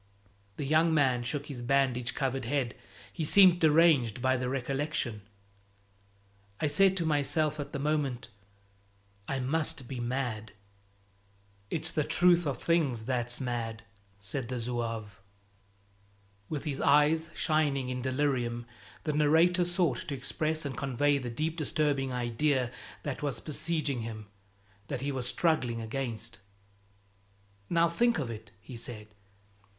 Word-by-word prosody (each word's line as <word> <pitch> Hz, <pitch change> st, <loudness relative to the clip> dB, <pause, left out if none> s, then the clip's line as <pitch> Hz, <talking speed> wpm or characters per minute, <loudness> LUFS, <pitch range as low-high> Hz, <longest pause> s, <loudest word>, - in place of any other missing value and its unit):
The 145 Hz, -, -3 dB
young 160 Hz, +3 st, +3 dB
man 130 Hz, -5 st, +3 dB
shook 140 Hz, +4 st, -3 dB
his 135 Hz, -5 st, -7 dB
bandage 125 Hz, -2 st, +1 dB
covered 135 Hz, -2 st, -1 dB
head; 125 Hz, -1 st, -1 dB, 0.4 s
he 165 Hz, -, -3 dB
seemed 180 Hz, +2 st, +7 dB
deranged 150 Hz, -8 st, +4 dB
by 130 Hz, +1 st, +2 dB
the 125 Hz, 0 st, -2 dB
recollection. 135 Hz, -3 st, -2 dB, 1.4 s
"I -, -, 0 dB
said 190 Hz, +5 st, +4 dB
to 170 Hz, -, 0 dB
myself 155 Hz, 0 st, +1 dB
at 145 Hz, -, -5 dB
the -, -, -3 dB
moment, 140 Hz, -5 st, -1 dB, 1.0 s
'I 135 Hz, -1 st, -2 dB
must 140 Hz, -1 st, 0 dB
be 130 Hz, -1 st, -5 dB
mad!'" 120 Hz, -3 st, -3 dB, 1.2 s
"It's 160 Hz, -, 0 dB
the 150 Hz, -, 0 dB
truth 175 Hz, +1 st, +4 dB
of 135 Hz, -4 st, -2 dB
things 140 Hz, -10 st, +1 dB
that's 120 Hz, -1 st, -1 dB
mad," 115 Hz, -4 st, -3 dB, 0.3 s
said 110 Hz, +6 st, -4 dB
the 125 Hz, +1 st, -3 dB
zouave. 115 Hz, -4 st, -4 dB, 1.3 s
With 150 Hz, -3 st, -3 dB
his 145 Hz, -3 st, -3 dB
eyes 155 Hz, +3 st, +4 dB
shining 145 Hz, -5 st, +1 dB
in 125 Hz, 0 st, -3 dB
delirium, 130 Hz, -3 st, -1 dB, 0.4 s
the 155 Hz, -, -1 dB
narrator 160 Hz, +5 st, +4 dB
sought 175 Hz, -7 st, +1 dB
to 140 Hz, -, -3 dB
express 155 Hz, +4 st, -2 dB
and 140 Hz, -, -3 dB
convey 140 Hz, 0 st, +1 dB
the 125 Hz, -2 st, -5 dB
deep 155 Hz, +7 st, -2 dB
disturbing 145 Hz, -3 st, 0 dB
idea 125 Hz, +1 st, 0 dB, 0.3 s
that 145 Hz, -3 st, -4 dB
was 140 Hz, -6 st, -2 dB
besieging 155 Hz, -3 st, -2 dB
him, 110 Hz, -1 st, -6 dB, 0.6 s
that 125 Hz, -, -4 dB
he 140 Hz, +1 st, -1 dB
was 130 Hz, -2 st, -2 dB
struggling 130 Hz, -7 st, +1 dB
against. 115 Hz, -1 st, -4 dB, 1.3 s
"Now 170 Hz, 0 st, +4 dB
think 235 Hz, +7 st, +2 dB
of 130 Hz, -6 st, -2 dB
it!" 110 Hz, 0 st, -9 dB
he 125 Hz, +5 st, -10 dB
said. 110 Hz, -2 st, -5 dB
135 Hz, 135 wpm, -30 LUFS, 120-155 Hz, 1.4 s, seemed